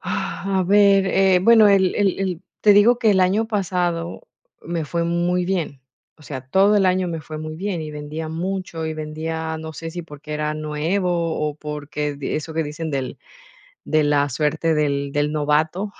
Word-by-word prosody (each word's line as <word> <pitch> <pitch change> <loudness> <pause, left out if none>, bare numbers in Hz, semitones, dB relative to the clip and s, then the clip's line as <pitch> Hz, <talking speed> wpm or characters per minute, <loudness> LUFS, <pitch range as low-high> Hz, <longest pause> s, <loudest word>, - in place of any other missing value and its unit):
A 195 -1 -2
ver, 200 0 +5
eh, 190 -1 +4
bueno, 225 0 +7
el 190 -2 +3
el 200 -2 +1
el 185 -3 -2 0.2
te 210 - +6
digo 215 +4 +5
que 225 -3 +3
el 190 -2 +3
año 195 +5 +2
pasado 180 - -2 0.4
me 170 -2 -3
fue 170 +3 -2
muy 175 +1 0
bien. 175 -7 -2 0.4
O - - -18
sea, 135 -3 -6
todo 190 +11 +3
el 195 - +3
año 185 0 +1
me 165 -2 -4
fue 155 +1 -8
muy 155 0 -6
bien, 185 -2 -3
y 155 - -6
vendía 150 +2 -6
mucho, 170 -1 -4
y 160 - -3
vendía, 160 +1 -4
no 160 0 -7
sé 165 +2 -6
si 175 +2 -5
porque 150 -1 -10
era 150 0 -2
nuevo, 155 +5 -1 0.4
o 150 - -3
porque 150 0 -4
di 140 - -4
eso 155 +1 -4
que 160 - +1
dicen 155 +2 -5
del 135 -3 -3 0.7
de 155 -1 +2
la 145 -1 +2
suerte 155 +3 0
del 140 -2 0
del 145 +1 0
novato, 155 +7 0
165 Hz, 190 wpm, -21 LUFS, 150-190 Hz, 0.7 s, bueno